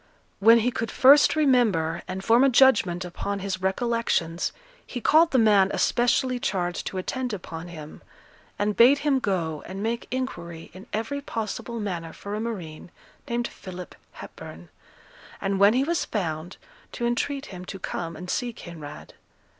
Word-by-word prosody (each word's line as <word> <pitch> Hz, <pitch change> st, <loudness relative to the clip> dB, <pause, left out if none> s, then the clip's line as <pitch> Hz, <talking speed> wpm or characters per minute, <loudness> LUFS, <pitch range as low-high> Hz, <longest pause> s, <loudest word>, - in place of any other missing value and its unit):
When 230 Hz, +3 st, +7 dB
he 245 Hz, +3 st, +1 dB
could 230 Hz, -2 st, -3 dB
first 280 Hz, +4 st, +6 dB
remember, 220 Hz, -, +2 dB
and 190 Hz, +1 st, -5 dB
form 230 Hz, +4 st, +5 dB
a 275 Hz, -, +6 dB
judgment 210 Hz, -9 st, +4 dB
upon 200 Hz, +3 st, -4 dB
his 190 Hz, -1 st, -4 dB
recollections, 190 Hz, -4 st, 0 dB, 0.3 s
he 250 Hz, -, -6 dB
called 320 Hz, +8 st, +5 dB
the 260 Hz, -, +2 dB
man 205 Hz, -4 st, +5 dB
especially 250 Hz, +1 st, +1 dB
charged 180 Hz, -5 st, -2 dB
to 190 Hz, -, -4 dB
attend 250 Hz, +6 st, -3 dB
upon 175 Hz, -3 st, -7 dB
him, 155 Hz, -3 st, -10 dB, 0.6 s
and 205 Hz, 0 st, 0 dB
bade 255 Hz, +5 st, +7 dB
him 275 Hz, -3 st, +3 dB
go 170 Hz, -, -2 dB
and 195 Hz, +2 st, -6 dB
make 230 Hz, +1 st, -2 dB
inquiry 170 Hz, -11 st, -5 dB
in 185 Hz, +2 st, -12 dB
every 230 Hz, +7 st, -3 dB
possible 230 Hz, -1 st, -4 dB
manner 175 Hz, -6 st, -4 dB
for 200 Hz, -, -7 dB
a 210 Hz, -, -2 dB
marine 185 Hz, -10 st, -6 dB, 0.4 s
named 235 Hz, 0 st, -1 dB
Philip 180 Hz, -1 st, -9 dB, 0.2 s
Hepburn, 85 Hz, +1 st, -11 dB, 0.7 s
and, 195 Hz, 0 st, -1 dB
when 200 Hz, +3 st, +6 dB
he 260 Hz, -, +3 dB
was 335 Hz, +3 st, 0 dB
found, 165 Hz, -5 st, -4 dB, 0.4 s
to 240 Hz, -, -3 dB
entreat 275 Hz, +4 st, -1 dB
him 180 Hz, 0 st, -8 dB
to 195 Hz, -, -7 dB
come 170 Hz, -2 st, -5 dB
and 180 Hz, +3 st, -8 dB
see 240 Hz, +6 st, -1 dB
Kinraid. 165 Hz, -7 st, -10 dB
205 Hz, 160 wpm, -25 LUFS, 175-245 Hz, 0.7 s, When